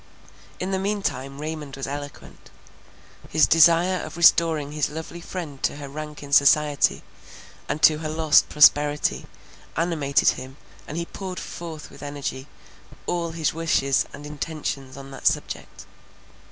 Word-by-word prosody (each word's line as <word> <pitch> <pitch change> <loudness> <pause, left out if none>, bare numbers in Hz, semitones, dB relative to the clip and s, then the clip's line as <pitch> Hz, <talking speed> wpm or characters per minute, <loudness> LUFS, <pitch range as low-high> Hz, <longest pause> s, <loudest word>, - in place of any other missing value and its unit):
In 185 +1 -3
the 190 - 0
mean 200 +1 -2
time 135 -1 -3
Raymond 150 -2 -5
was 135 - -5
eloquent. 145 +1 -8 0.8
His 155 - +4
desire 170 +3 +4
of 155 +1 -8
restoring 165 -3 +4
his 150 -1 -1
lovely 160 +3 -7
friend 165 -6 -7
to - - 0
her 145 -1 -7
rank 150 +1 -8
in 140 0 -8
society, 145 +1 +4 0.7
and 150 - -3
to 155 0 +6
her 155 -1 -4
lost 155 -1 +4
prosperity, 150 0 +4 0.5
animated 155 -4 +2
him, 130 +2 -5 0.3
and 155 - -6
he 170 - -2
poured 185 0 -7
forth 160 -3 -8
with - - -14
energy, 145 -2 -5 0.6
all 170 -1 -1
his 160 -2 -1
wishes 155 -4 +1
and 145 +1 -10
intentions 145 -3 -5
on 135 0 -10
that 135 - -2
subject. - - -2
150 Hz, 145 wpm, -24 LUFS, 140-165 Hz, 0.8 s, to